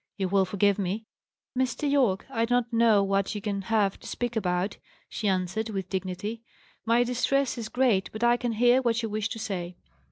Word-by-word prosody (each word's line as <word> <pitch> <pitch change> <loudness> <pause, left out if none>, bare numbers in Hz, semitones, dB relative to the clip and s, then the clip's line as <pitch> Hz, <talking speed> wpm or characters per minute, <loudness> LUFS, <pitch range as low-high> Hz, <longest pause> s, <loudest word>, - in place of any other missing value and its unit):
You 190 -2 -1
will 195 0 +3
forgive 200 +1 +1
me?" 200 +4 -2 0.5
"Mr. 260 +3 0
Yorke, 255 -10 +2
I 230 -3 +1
do 245 +1 +1
not 245 -1 0
know 225 -3 +5
what 195 +1 0
you - - -2
can 200 -1 -3
have 205 -1 +1
to - - -11
speak 240 -1 -3
about," 185 -1 -1 0.3
she 215 - -3
answered, 190 +4 -1
with 190 -3 -4
dignity. 190 +4 -4 0.5
"My 235 +1 +4
distress 250 +2 +1
is 230 -3 -5
great, 240 -7 +2
but 220 +2 -5
I 240 0 +5
can 240 -1 -2
hear 245 +3 +4
what 235 -2 0
you 225 - -2
wish 215 +1 -2
to 230 - -5
say." 185 -6 -4
220 Hz, 200 wpm, -27 LUFS, 195-240 Hz, 0.5 s, know